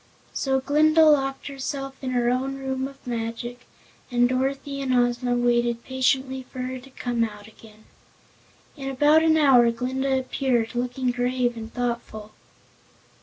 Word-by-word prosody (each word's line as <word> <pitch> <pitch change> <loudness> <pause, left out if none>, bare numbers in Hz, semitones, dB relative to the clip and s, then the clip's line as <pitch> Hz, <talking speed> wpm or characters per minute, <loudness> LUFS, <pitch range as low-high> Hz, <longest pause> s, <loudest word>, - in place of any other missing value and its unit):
So 265 -1 0
Glinda 310 +4 +4
locked 270 -3 +2
herself 275 -1 -5
in 260 - -2
her 245 -1 +1
own 265 +2 -1
Room 265 0 -3
of 275 0 -15
Magic 240 +1 -5 0.4
and 245 -1 +3
Dorothy 275 +2 -2
and 265 -1 -1
Ozma 245 0 +1
waited 240 -1 +1
patiently 260 0 0
for 255 +1 -15
her 255 0 -4
to 260 +2 -15
come 245 -3 -2
out 210 -2 -5
again. 220 0 -17 0.9
In 270 -3 -5
about 295 +4 +4
an 320 -1 +4
hour 260 -6 +6
Glinda 260 +3 -1
appeared, 255 -3 -1
looking 250 +1 -1
grave 245 0 0
and 225 0 -8
thoughtful. 235 -3 -4
255 Hz, 145 wpm, -24 LUFS, 240-270 Hz, 0.9 s, hour